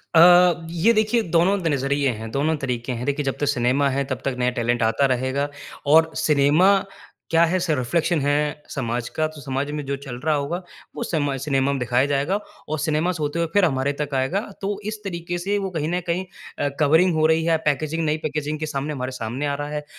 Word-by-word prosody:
अ, 175 0 +6
ये 175 +7 +3
देखिए, 220 +2 +2
दोनों 180 +4 +3
द 170 - -1
नज़रिए 140 -1 +1
हैं, 115 - -6
दोनों 150 +4 +1
तरीके 125 -3 -3
हैं। 125 +1 -4
देखिए 145 0 -1
जब 135 - -2
तक 145 - +1
सिनेमा 135 +1 +2
है 135 +1 0
तब 130 - -3
तक 135 -2 -1
नया 125 0 +2
टैलेंट 120 0 +1
आता 115 +5 +2
रहेगा। 130 +3 -1 0.4
और 160 +2 +5
सिनेमा 150 +7 +4 0.5
क्या 165 0 +4
है 175 +3 +2
स 175 -1 -3
रिफ़्लेक्शन 165 +6 0
है 150 +1 0
समाज 120 -3 -3
का। 155 - +1
तो 155 -1 -11
समाज 135 +2 -3
में 150 - -4
जो 140 0 -2
चल 125 -3 -7
रहा 155 -1 +3
होगा 145 +5 -2 0.4
वो - - -3
समाज 145 -4 -1
सिनेमा 140 -1 +1
में 140 - -2
दिखाया 125 +2 +2
जाएगा 145 +7 0 0.3
और 155 - -2
सिनेमा 155 +3 +1
से 165 -3 -5
होते 150 +3 -2
हुए 170 - +1
फिर 205 -2 +5
हमारे 135 -3 0
तक 145 -1 -4
आएगा। 135 +9 +1 0.2
तो 200 +1 -2
इस 215 - -5
तरीके 175 -2 -4
से 200 +4 -1
वो 195 -1 -2
कहीं 155 -3 -2
न 180 - +1
कहीं 175 +3 0 0.4
अ - - +2
कवरिंग 160 +4 +4
हो 155 0 +3
रही 160 0 +3
है - - +1
या 160 - +4
पैकेजिंग 155 +3 0
नई 150 +1 +1
पैकेजिंग 155 0 -2
के 155 - -2
सामने 150 0 -3
हमारे 130 -1 -4
सामने 125 +3 -4
आ 140 - -1
रहा 145 0 -4
है। 150 0 -4
150 Hz, 230 wpm, -23 LUFS, 135-165 Hz, 0.5 s, अ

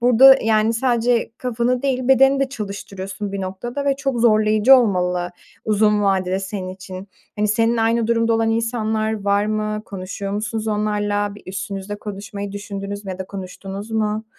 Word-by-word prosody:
burada 250 +3 +8
yani 220 0 +3
sadece 240 -1 +1
kafanı 245 0 -1
değil 255 -2 -1
bedeni 270 +1 +5
de 275 - +1
çalıştırıyorsun 200 -3 -6
bir 200 - -3
noktada 240 +9 -4
ve 275 -1 +1
çok 270 -4 -2
zorlayıcı 215 +2 +5
olmalı 180 -6 +1 0.3
uzun 210 -1 +2
vadede 190 -1 +1
senin 190 -1 -5
için. 185 +1 -9 0.3
Hani, 210 0 +1
seninle 225 +2 +2
aynı 230 0 +2
durumda 230 0 +2
olan 225 0 +2
insanlar 220 -2 -1
var 200 +1 +2
mı? 215 0 -2
Konuşuyor 195 +1 -6
musunuz 220 +1 -3
onlarla? 210 -1 -1 0.2
Bir 205 - -14
üstünüzle 195 +1 -5
konuşmayı 200 -1 -6
düşündünüz 200 0 -6
mü 195 - -5
ya 185 - -6
da 190 - -5
konuştunuz 195 +2 -7
mu? 215 0 -1
215 Hz, 160 wpm, -21 LUFS, 200-230 Hz, 0.3 s, burada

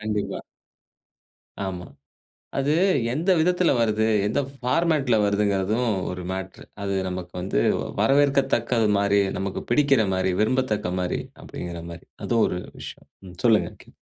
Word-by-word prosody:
கண்டிப்பா. 105 -1 -3 1.2
ஆமா. 90 -2 -5 0.7
அது 140 +2 +1 0.4
எந்த 165 +8 0
விதத்துல 180 +1 +3
வருது? 110 -1 +2 0.2
எந்த 110 +7 +1
ஃபார்மேட்ல 135 -1 +1
வருதுங்கிறதும் 100 +3 +1 0.2
ஒரு 90 0 -5
மேட்ரு. 95 0 -6 0.2
அது 100 -1 -1
நமக்கு 90 -1 -6
வந்து, 90 -9 0 0.4
வரவேற்கத்தக்கது 135 -5 +2
மாரி, 100 0 +3 0.2
நமக்கு 95 0 -3
பிடிக்கிற 135 -3 +4
மாரி, 95 0 +1
விரும்பத்தக்க 110 -5 0
மாரி 90 -1 -1 0.2
அப்படிங்கிற 85 -1 -7
மாரி. 85 - -11 0.2
அதுவும் 115 -2 +2
ஒரு 90 - -3 0.2
விஷயம். - - -10 0.2
ம். 90 - -13
சொல்லுங்க. 115 -3 +4
கே - - -19
110 Hz, 125 wpm, -24 LUFS, 95-130 Hz, 1.2 s, பிடிக்கிற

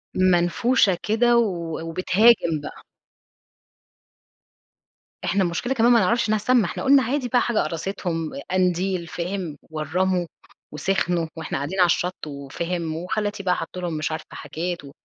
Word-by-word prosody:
منفوشة 185 +4 +3
كده 235 +2 +3
و 170 -8 -1
وبتهاجم 180 0 +3
بقى. - - -9 2.4
إحنا 195 +1 +2
المشكلة 185 +9 -1
كمان 240 0 +4
ما 235 - +6
نعرفش 225 +3 +2
إنها 215 - +3
سامة، 235 +1 +3
إحنا - - -4
قُلنا 275 -1 +5
عادي 255 +1 -1
بقى 245 - +2
حاجة 235 -3 0
قرصتهم، 165 0 -2 0.2
قنديل، 185 -1 0
فاهم؟ 175 -2 -4
ورّموا 175 +4 -1 0.5
وسخنوا، 175 +1 0
وإحنا 160 - -3
قاعدين 145 +8 -4
على 180 - +7
الشط، 175 -1 -1
وفاهم، 160 +4 -4
وخالاتي 205 +4 -3
بقى 180 -1 +2
حطوا 180 +2 -6
لهم 175 -2 -3
مش 155 0 -2
عارفة 155 0 -4
حاجات 175 +1 -5
و 140 - -11
180 Hz, 140 wpm, -23 LUFS, 165-210 Hz, 2.4 s, على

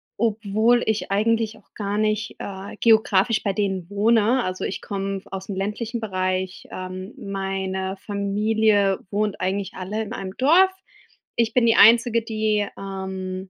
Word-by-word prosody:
obwohl 225 +2 +2
ich 220 -2 -1
eigentlich 220 +1 +1
auch 210 - -25
gar 205 0 -3
nicht, 215 +1 -1
äh, 195 +1 -7
geografisch 220 -1 +3
bei 200 - +1
denen 190 -3 -2
wohne. 220 +4 +3
Also, 185 0 -4
ich - - -3
komm 195 -1 -3
aus'm 195 +1 -6
ländlichen 210 +5 -3
Bereich. 185 -3 -2
Ähm, 185 +2 -7
meine 195 -3 -3
Familie 205 0 +1
wohnt 210 0 -1
eigentlich 190 +1 -2
alle 200 +4 -4
in 220 +1 -5
einem 190 -4 -6
Dorf. 345 +8 +5 0.6
Ich 230 -1 +1
bin 250 -2 +4
die 230 0 +4
Einzige, 230 +1 +6
die, 215 -2 0
ähm, 190 -1 -5
205 Hz, 140 wpm, -23 LUFS, 190-220 Hz, 0.6 s, Einzige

